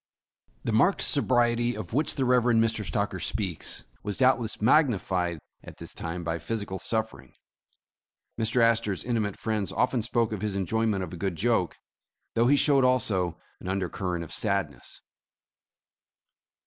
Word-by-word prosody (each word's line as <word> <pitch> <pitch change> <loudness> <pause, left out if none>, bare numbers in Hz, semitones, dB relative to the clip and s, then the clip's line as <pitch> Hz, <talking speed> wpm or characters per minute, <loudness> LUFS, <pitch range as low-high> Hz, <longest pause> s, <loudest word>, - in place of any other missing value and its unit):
The - - -1
marked 120 - +3
sobriety 120 -3 +2
of 110 - -7
which 150 +5 +1
the 135 - 0
Rev. 125 0 +4
Mr. 115 -2 +2
Stocker 100 +2 -2
speaks, 95 -7 -2 0.2
was 105 -1 -4
doubtless 125 -4 +2
magnified 95 - +2 0.3
at - - -11
this - - -8
time 85 +2 -5
by 85 0 -2
physical 100 +1 -4
suffering. 110 +3 -4 1.0
Mr. 115 +2 +1
Astor 115 -3 +2
's - - -6
intimate 110 -5 -1
friends 110 -3 -2
often 125 -1 +1
spoke 115 0 0
of 105 -3 -4
his 105 -2 -2
enjoyment 100 +1 0
of 90 - -7
a - - -6
good 95 0 -2
joke, 105 -2 0 0.6
though 115 +1 +3
he 145 - +5
showed 140 -1 +4
also 100 -10 +1 0.2
an - - -9
undercurrent 90 -2 -2
of 80 - -9
sadness. 100 - -3
110 Hz, 150 wpm, -27 LUFS, 95-120 Hz, 1.0 s, he